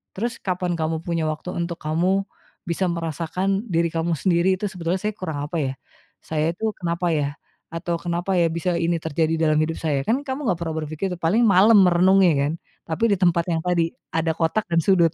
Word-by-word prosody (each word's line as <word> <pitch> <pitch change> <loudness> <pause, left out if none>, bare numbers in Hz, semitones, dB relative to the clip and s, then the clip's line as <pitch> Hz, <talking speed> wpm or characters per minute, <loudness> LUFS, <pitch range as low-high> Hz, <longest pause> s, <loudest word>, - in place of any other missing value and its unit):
terus 230 +4 -3
kapan 180 -2 -1
kamu 160 0 -1
punya 165 -2 -1
waktu 155 +4 -4
untuk 170 0 -3
kamu 180 +6 +1 0.4
bisa 170 +3 -1
merasakan 170 +5 -2
diri 170 0 +2
kamu 165 +1 -1
sendiri 180 +3 +2
itu, 210 - -2
"Sebetulnya 180 0 -2
saya 210 0 -2
kurang 160 -7 -4
apa 160 - -7
ya? 135 -1 -1 0.5
Saya 155 +1 -1
itu 220 +4 -2
kenapa 170 0 -2
ya?" 145 -1 0 0.4
Atau 170 +1 -2
"Kenapa 175 +2 -2
ya 170 - +4
bisa 170 +2 -1
ini 170 0 +1
terjadi 160 +1 0
dalam 155 -1 +3
hidup 160 +1 -3
saya?" 145 -4 0
Kan 245 +5 +2
kamu 265 -1 -3
nggak 170 - -2
pernah 160 -2 -3
berpikir 155 +5 -3
itu, - - -2
paling 205 +9 +2
malam 200 +3 +6
merenungnya 180 0 +5 0.2
kan, - - -2 0.3
tapi 160 +7 -3
di - - +1
tempat 170 -2 +3
yang 160 -1 0
tadi 170 -2 +1 0.2
ada 165 0 0
kotak 165 +7 0
dan 165 0 +3
sudut. 170 -4 +4
170 Hz, 200 wpm, -23 LUFS, 165-185 Hz, 0.5 s, malam